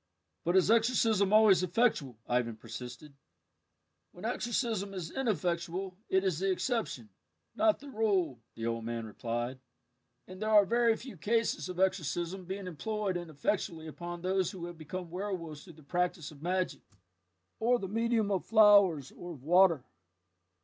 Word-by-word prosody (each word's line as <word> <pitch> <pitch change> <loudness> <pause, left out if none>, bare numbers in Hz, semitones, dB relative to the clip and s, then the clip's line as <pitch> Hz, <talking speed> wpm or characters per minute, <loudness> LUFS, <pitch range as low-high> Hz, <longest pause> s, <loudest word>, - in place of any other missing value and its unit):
"But 175 +2 +1
is 190 +3 +5
exorcism 225 -4 +3
always 215 -4 +6
effectual?" 180 - +1
Ivan 120 -2 0
persisted. 125 +5 -9 1.0
"When - - -9
exorcism 220 -5 -1
is 170 -3 -5
ineffectual 180 - -2
it 190 0 +3
is 185 -5 0
the 195 +1 +1
exception, 225 +2 -2 0.5
not 325 -1 +3
the 285 - -12
rule," 195 - 0 0.2
the 115 - -5
old 115 0 -2
man 115 0 -4
replied, 120 +3 -4 0.7
"and 185 +2 -10
there 215 - -1
are 210 -2 +7
very 235 +2 +3
few 245 -4 -10
cases 225 +3 0
of 180 0 -6
exorcism 185 0 0
being 190 +2 -5
employed 200 +3 -3
ineffectually 170 +1 -2
upon 175 +2 -7
those 185 -1 +1
who 175 -3 -7
have 175 -1 -9
become 175 +2 -6
werwolves 175 -5 -5
through 175 - -12
the 155 0 -17
practice 175 -1 -1
of 145 -2 -15
magic, 185 +2 -1 0.8
or 245 +2 +3
the 195 - -5
medium 225 0 +1
of 190 -3 0
flowers 200 - +5
or 175 0 -8
of 135 -5 -13
water." 170 -3 +5
185 Hz, 150 wpm, -31 LUFS, 160-210 Hz, 1.0 s, are